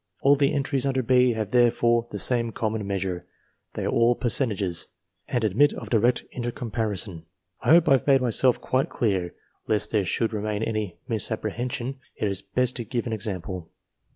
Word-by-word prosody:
All 140 +1 +5
the 140 +1 +2
entries 140 -2 0
under 130 -1 0
B 125 0 +4
have 110 -2 -3
therefore 120 -1 +3
the - - -5
same 120 -2 +1
common 110 -2 -2
measure, 95 -3 -3 0.5
they - - -3
are - - 0
all 115 +1 +3
fercentages, 105 -8 -1 0.4
and 120 -2 -1
admit 115 +8 +3
of - - -8
direct 120 +2 +3
intercomparison. 110 -6 -3 0.4
I - - -2
hope 170 +1 +7
have 135 -1 +3
made 135 -1 +6
myself 125 0 +2
quite 130 +1 0
clear: 95 -6 -1 0.3
lest 105 -1 +1
there 105 -3 +2
should 110 +5 -1
remain 105 0 -2
any 110 -6 -3
misapprehension, 120 +4 -2 0.2
it 105 - -1
is 100 -1 -2
better 125 +5 -1
to 120 - -3
give 120 0 -3
an 115 - -3
example. 95 -5 -4
115 Hz, 170 wpm, -25 LUFS, 105-125 Hz, 0.5 s, hope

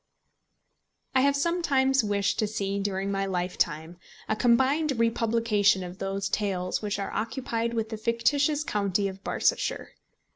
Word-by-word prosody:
I 260 - +4
have 280 +1 +3
sometimes 280 -5 +2
wished 205 -1 0
to 215 - +2
see 200 -1 -2
during 195 0 -2
my 195 0 -1
lifetime 175 -2 -2 0.3
a 220 - 0
combined 265 +7 +3
republication 230 -4 +2
of 180 +1 -8
those 195 0 -2
tales 185 -4 -1
which 210 -1 -2
are 200 - -4
occupied 230 0 -2
with 225 -1 -1
the 220 - -5
fictitious 245 +7 +1
county 200 -4 0
of 195 0 -8
Barsetshire. - - 0
215 Hz, 140 wpm, -27 LUFS, 195-245 Hz, 0.3 s, I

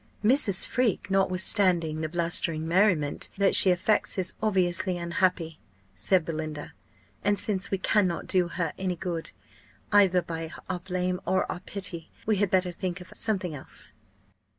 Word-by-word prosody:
"Mrs. 215 -5 +5
Freke, 230 -6 -1
notwithstanding 185 -4 +2
the 155 - -3
blustering 165 -1 -1
merriment 170 -5 +3
that 200 0 +2
she 190 - +9
affects, 185 +5 0
is 185 -1 -1
obviously 185 -3 0
unhappy," 170 -2 -1 0.3
said 165 - +1
Belinda; 155 -2 -6 0.5
"and 205 0 +1
since 195 -1 +1
we 195 - -1
cannot 185 -2 0
do 185 -2 +1
her 170 -2 -3
any 185 -1 -2
good, 170 -2 -4 0.6
either 190 -4 +4
by 165 -1 -6 0.2
our 185 -1 -3
blame 180 0 -3
or 190 - +1
our - - -6
pity, 185 -3 -7 0.2
we 215 -1 +1
had 200 0 +1
better 185 -1 +1
think 180 +1 -5
of 180 0 -13
something 190 -6 -2
else." 140 - -10
180 Hz, 150 wpm, -26 LUFS, 170-195 Hz, 0.6 s, she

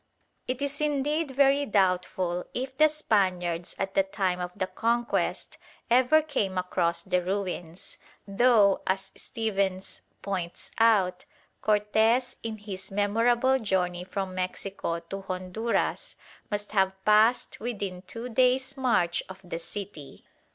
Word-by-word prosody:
It 255 +2 -2
is 285 +1 -2
indeed 295 +1 0
very 275 +1 +3
doubtful 180 -2 +1
if 260 +1 -3
the 310 +3 +6
Spaniards 185 - 0
at 195 0 -3
the - - +4
time 190 -2 -1
of 180 0 -4
the 185 - 0
Conquest 235 +4 -1 0.3
ever 260 +6 +5
came 205 -11 -1
across 180 -2 0
the 180 -1 +1
ruins, 180 -2 -4 0.3
though, 205 -1 +4
as 190 0 -1
Stephens 195 -4 -2 0.2
points 180 -3 -4
out, 205 -6 +3 0.4
Cortes 220 +4 +2
in 225 -1 -4
his 195 -2 -7
memorable 235 +6 +2
journey 180 -5 -1
from 190 0 -4
Mexico 185 -2 -3
to 195 +4 -7
Honduras 190 - -2 0.3
must 205 -1 -3
have 190 -2 +2
passed 215 +3 +4
within 200 -6 -4
two 230 +6 -6
days' 255 +2 +2
march 230 -10 +1
of 190 0 -9
the 175 -2 -5
city. 170 -5 -8
200 Hz, 125 wpm, -27 LUFS, 185-240 Hz, 0.4 s, the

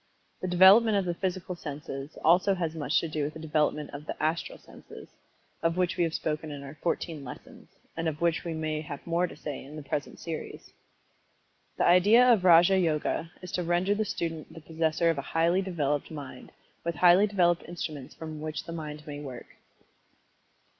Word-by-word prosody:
The 185 - -2
development 195 +5 +7
of 195 - 0
the 175 - -1
physical 185 0 -3
senses, 145 -2 -7
also 180 +4 +5
has 165 -3 -2
much 150 -3 +1
to 165 - -3
do 155 -1 -2
with 150 +2 -3
the - - -7
development 150 -1 0
of 145 +2 -9
the - - -5
"Astral 160 +2 -1
Senses," - - -13 0.5
of 165 +1 0
which 180 0 +1
we 180 - +1
have 165 -1 -1
spoken 155 0 -3
in 145 -1 -7
our 140 +1 -8
"Fourteen 165 -3 -2
Lessons," 125 - -11 0.3
and 165 0 -2
of 155 -1 -3
which 170 -1 +1
we 170 -2 -4
may 155 -1 -2
have 145 -2 -8
more 170 +1 +1
to - - -11
say 145 -2 -6
in 140 +3 -11
the 155 - -7
present 145 +1 -4
series. 165 -2 -7 1.0
The - - +2
idea 210 +8 +6
of 205 -5 +1
Raja 180 +2 +6
Yoga 165 0 0
is 180 - -7
to 180 - -1
render 175 +4 +1
the 215 +1 0
student 165 -6 -4
the 165 - -11
possessor 160 +1 +1
of 155 - -3
a 140 - -8
highly 170 +3 +3
developed 150 -6 -1
Mind, 140 -5 -9 0.3
with 170 -1 -2
highly 180 +6 +6
developed 175 -4 +2
instruments 155 -6 -6
with 160 -1 -6
which 155 -2 -4
the 165 - -7
mind 150 -2 -7
may 145 -1 -7
work. 130 -4 -9
165 Hz, 195 wpm, -28 LUFS, 150-180 Hz, 1.0 s, development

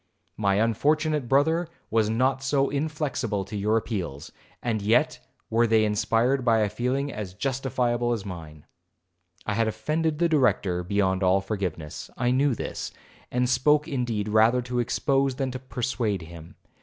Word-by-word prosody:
My 100 -2 +1
unfortunate 145 +6 +1
brother 160 +5 +3 0.2
was 110 -2 +2
not 130 +4 +1
so 135 0 +1
inflexible 140 -9 -2
to 105 - -8
your 105 +2 +1
appeals, 90 - -4 0.3
and 115 -3 -1
yet 110 +4 +2 0.3
were 115 +1 +3
they 110 -1 +4
inspired 115 +5 +1
by 115 -2 +3
a 105 - +1
feeling 130 +6 -1
as 95 -4 -6
justifiable 120 -1 0
as 110 -4 -2
mine.' 80 -5 -9 0.8
I 105 - -1
had 115 +1 +1
offended 150 +9 -1
the 170 +2 +3
Director 125 - +2
beyond 95 0 +1
all 95 +1 +4
forgiveness. 95 -6 -4
I 125 0 +1
knew 135 0 +2
this, - - -5 0.4
and 125 0 +1
spoke 150 +4 +3
indeed 120 -8 -2
rather 110 +4 +4
to 125 0 -2
expose 135 +2 +1
than 135 -1 -2
to 130 - -5
persuade 120 -6 -2
him. 85 0 -12
120 Hz, 155 wpm, -26 LUFS, 105-135 Hz, 0.8 s, they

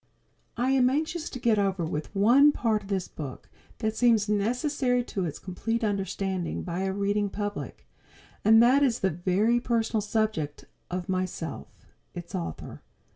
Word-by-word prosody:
I 250 +2 +1
am 255 -2 +4
anxious 315 +4 -2
to - - -6
get 230 -3 +2
over 190 -4 0
with 155 +4 -5
one 250 +9 +6
part 225 -6 0
of 200 - -13
this 190 -3 -1
book 140 -5 -8 0.3
that 220 -1 -2
seems 225 -3 +3
necessary 245 +4 +1
to 195 -5 -3
its 155 - -4
complete 225 +5 -3
understanding 195 -3 -2
by 175 0 -4
a 190 0 -1
reading 200 +1 0
public, 205 +1 -5 0.6
and 225 +2 +7
that 260 +4 +5
is 250 -5 +2
the 190 - +2
very 190 +8 +1
personal 230 -2 0
subject 210 -9 -2 0.2
of 180 0 -4
myself, 185 -3 -3 0.5
its - - -8
author. 85 -2 -5
210 Hz, 155 wpm, -27 LUFS, 190-240 Hz, 0.6 s, and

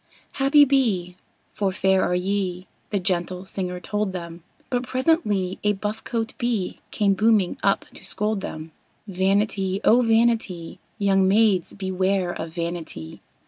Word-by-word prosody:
"Happy 285 +2 +5
be! 215 -11 +1 0.4
for 200 -2 0
fair 190 0 +2
are 180 - +1
ye!" 185 -1 -1 0.2
the 205 - 0
gentle 180 0 -1
singer 180 -2 -4
told 205 +2 -2
them; 170 -2 -7 0.3
But 245 -1 +1
presently 250 - 0
a 210 0 +3
buff 210 +2 -4
coat 225 -2 -3
Bee 235 -7 -1
came 205 -2 +2
booming 210 -2 +2
up 195 - +1
to - - -12
scold 210 -1 -1
them. 155 -4 -7 0.4
"Vanity, 195 0 0
oh, 240 +3 +5
vanity! 225 -7 +1 0.2
Young 195 -2 +3
maids, 200 -3 +3
beware 190 -1 0
of 165 - -6
vanity!" 165 - -5
195 Hz, 140 wpm, -24 LUFS, 180-220 Hz, 0.4 s, Happy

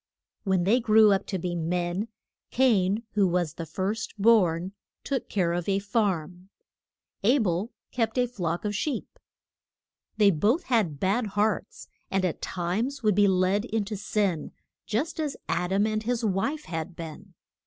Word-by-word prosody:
When 190 -2 +2
they 215 +7 +4
grew 220 -2 +6
up 195 - +1
to 190 - -2
be 175 0 -3
men, 175 +4 -1 0.4
Cain, 220 -5 +2
who 205 -3 +3
was 175 -3 0
the 165 -1 -7
first 195 +7 -3
born, 190 -5 +4 0.3
took 270 -3 -3
care 175 -4 +1
of 175 +2 -2
a 195 - +2
farm; 190 -3 -1 0.7
A 245 +7 +4
bel 200 -1 0 0.2
kept 225 -1 -1
a 250 - +4
flock 175 -7 -3
of 210 - -1
sheep. 285 +7 -3 1.0
They 205 -2 +6
both 210 - +2
had 205 - +1
bad 210 +7 +1
hearts, 210 -1 -1 0.2
and 190 -1 +1
at 175 - -2
times 220 +10 -2
would 210 -1 +4
be 205 +1 +4
led 190 +2 +2
in 220 -3 -1
to 210 +1 -4
sin, 200 -4 -1 0.3
just 295 +10 -2
as 300 -3 -2
Ad 180 +1 -1
am 200 +2 +3
and 215 0 -1
his 235 +1 -1
wife 220 +10 -1
had 165 +1 -5
been. 170 +3 -9
200 Hz, 165 wpm, -27 LUFS, 180-225 Hz, 1.0 s, grew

